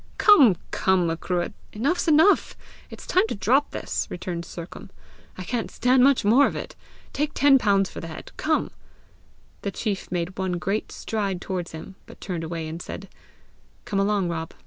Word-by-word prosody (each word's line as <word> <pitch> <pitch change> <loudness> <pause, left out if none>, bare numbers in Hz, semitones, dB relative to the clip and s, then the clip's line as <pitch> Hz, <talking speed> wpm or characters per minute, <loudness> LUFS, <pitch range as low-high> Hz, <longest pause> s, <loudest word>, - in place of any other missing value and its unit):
"Come, 275 - +6
come, 190 -2 +2
Macruadh! 175 +3 -2 0.2
enough's 285 +12 0
enough! 320 +6 +4 0.3
It's - - -10
time 370 +4 +2
to - - -3
drop 255 +9 +2
this!" - - -3
returned 175 -1 -5
Sercombe. 170 +1 -9 0.5
"I 185 - -5
can't 230 +5 -3
stand 250 0 +3
much 275 -5 +4
more 245 +7 +6
of - - -5
it! - - -6 0.4
Take 300 +1 -2
ten 275 -1 +5
pounds 195 -4 +2
for - - -7
the 165 - -7
head! 160 - -9
Come!" 310 0 0 0.9
The 200 - -2
chief 200 -1 -4
made 180 +1 -3
one 190 -1 -1
great 195 +5 -2
stride 200 -4 -3
towards 180 -2 -4
him, 160 +4 -8
but - - -14
turned 175 -4 -4
away, 165 0 -4
and 165 +2 -6
said, 195 +2 -8 0.8
"Come 195 - -1
along, 200 -2 +1
Rob! 165 -1 -4
195 Hz, 170 wpm, -24 LUFS, 175-250 Hz, 0.9 s, Come